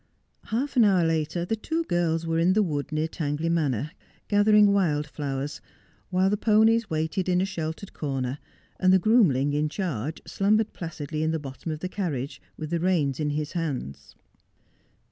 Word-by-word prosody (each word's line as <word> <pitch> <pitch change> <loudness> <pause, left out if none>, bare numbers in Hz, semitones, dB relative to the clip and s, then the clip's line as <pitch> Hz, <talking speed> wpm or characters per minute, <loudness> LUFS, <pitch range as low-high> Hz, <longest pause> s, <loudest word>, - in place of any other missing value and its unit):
Half 265 +7 -2
an 240 - +7
hour 190 -5 +4
later 165 +1 0
the 225 - -1
two 320 +9 -2
girls 170 - 0
were 165 0 0
in 175 +3 +4
the 215 +1 +3
wood 150 -6 -3
near 155 +1 0
Tang 150 -3 -3
ley 165 +2 -1
Manor, 150 -4 0 0.4
gathering 205 0 +5
wild 155 -7 +1
flowers, 145 -1 -4 0.5
while 185 0 +2
the 210 - +1
ponies 220 +1 +3
waited 160 +4 -1
in 180 0 +3
a 190 - +2
sheltered 165 0 -5
corner, 135 -2 -3 0.4
and 185 0 +4
the 190 - +7
groomling 175 - +3
in 150 +1 +1
charge 155 - -3
slumbered 215 +2 +1
placidly 155 -2 -5
in 160 - +1
the 160 - 0
bottom 145 +2 -6
of 155 0 -5
the 185 - -2
carriage, 155 -9 -4 0.2
with 155 0 -6
the 170 - +1
reins 160 -6 +1
in 150 -1 0
his 150 +1 -2
hands. 145 - -4
165 Hz, 180 wpm, -26 LUFS, 150-195 Hz, 0.5 s, an